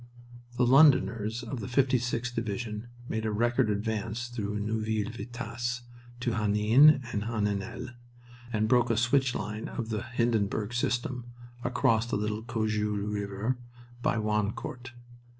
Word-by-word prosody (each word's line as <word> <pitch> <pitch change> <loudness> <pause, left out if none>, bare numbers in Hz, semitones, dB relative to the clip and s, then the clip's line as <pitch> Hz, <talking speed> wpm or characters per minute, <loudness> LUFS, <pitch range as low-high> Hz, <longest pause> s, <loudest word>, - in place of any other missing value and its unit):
The 125 - +4
Londoners 120 -5 +4
of 120 +1 -5
the 105 - -5
56th 125 -1 +1
Division 110 0 -3 0.2
made 110 -2 -2
a 110 - 0
record 120 +2 +2
advance 110 +3 -2
through 105 -3 -3
Neuville 110 0 -1
Vitasse 120 +2 -4 0.4
to 120 - 0
Henin 110 +7 +5
and 105 0 -1
Heninel, 115 +2 -2 0.6
and 110 -1 +1
broke 120 +1 +4
a 115 - +2
switch 125 +2 +2
line 105 +1 -4
of 115 -2 -5
the 110 -1 -1
Hindenburg 115 -2 0
system 120 0 -1 0.4
across 120 -2 +2
the - - 0
little 105 +1 -2
Cojeul 105 -3 -1
River 100 +5 -2 0.4
by 115 - +1
Wancourt. 110 +4 -2
115 Hz, 130 wpm, -29 LUFS, 105-120 Hz, 0.6 s, Henin